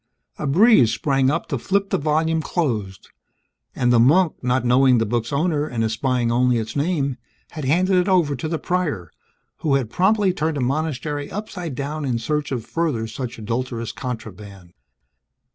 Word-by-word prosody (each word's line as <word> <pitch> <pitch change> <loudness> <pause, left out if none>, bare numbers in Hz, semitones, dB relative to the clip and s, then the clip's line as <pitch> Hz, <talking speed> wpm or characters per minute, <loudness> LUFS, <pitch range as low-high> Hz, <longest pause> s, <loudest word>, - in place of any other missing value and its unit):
A 150 - -2
breeze 170 - +5
sprang 135 +2 +1
up 165 +4 -1
to 140 - -2
flip 195 +7 0
the - - +1
volume 160 +2 +1
closed; 110 - -3 0.7
and 125 -1 +2
the 120 - +5
monk, 155 +8 +4
not 125 0 +1
knowing 125 +1 +4
the 115 - +1
book's 115 +1 -2
owner 150 0 0
and 115 -5 -2
espying 120 +2 0
only 125 0 +2
its 110 0 -4
name, 145 -3 0 0.3
had 155 -4 -6
handed 180 +7 +2
it 180 +1 +2
over 170 -7 +3
to 130 +5 -4
the 165 +1 -1
Prior 155 - -2 0.5
who 145 -3 +1
had 130 -5 -1
promptly 195 +1 +2
turned 155 -3 -1
the - - -1
monastery 145 +1 -2
upside 180 -8 -6
down 145 +3 -4
in 125 -4 0
search 150 +6 -2
of 120 -4 -3
further 155 -9 -1
such 115 +2 -6
adulterous 115 +1 -3
contraband! 100 -7 -8
135 Hz, 170 wpm, -22 LUFS, 120-160 Hz, 0.7 s, breeze